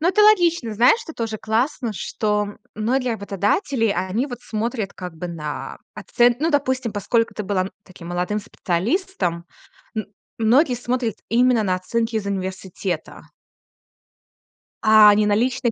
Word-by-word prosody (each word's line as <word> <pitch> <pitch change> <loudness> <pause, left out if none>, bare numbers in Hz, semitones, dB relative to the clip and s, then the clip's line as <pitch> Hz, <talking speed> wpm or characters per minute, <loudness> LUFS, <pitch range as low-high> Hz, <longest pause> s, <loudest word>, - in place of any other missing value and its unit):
ну 335 - +2
это 420 +3 +4
логично. 345 - +4
Знаешь, 245 - +5
что 320 - -9
тоже 225 -2 -3
классно, 235 +2 -1
что 210 0 -2 0.2
многие 245 +3 0
работодатели, 215 - 0
они 195 +6 0
вот 245 -3 -7
смотрят 220 -1 -3
как 180 -2 -8
бы 175 +2 -5
на 150 -3 -6 0.2
оцен 240 0 +2
Ну, 325 - +2
допустим, 260 -5 0
поскольку 230 +3 0
ты 210 - -5
была, 190 -1 0
м, 190 - -5
таким 175 -2 -12
молодым 180 +4 -1
специалистом, 185 - -2 0.5
м, 215 - -1 0.3
многие 245 +5 +3
смотрят 245 -2 -2 0.2
именно 245 -1 +4
на 185 -2 +1
оценки 225 +5 -2
из 205 - -2
университета 190 -3 -4 1.6
а 215 -1 +8
не 210 - +3
на 205 0 +3
личные 250 +1 +1
220 Hz, 145 wpm, -22 LUFS, 195-250 Hz, 1.6 s, а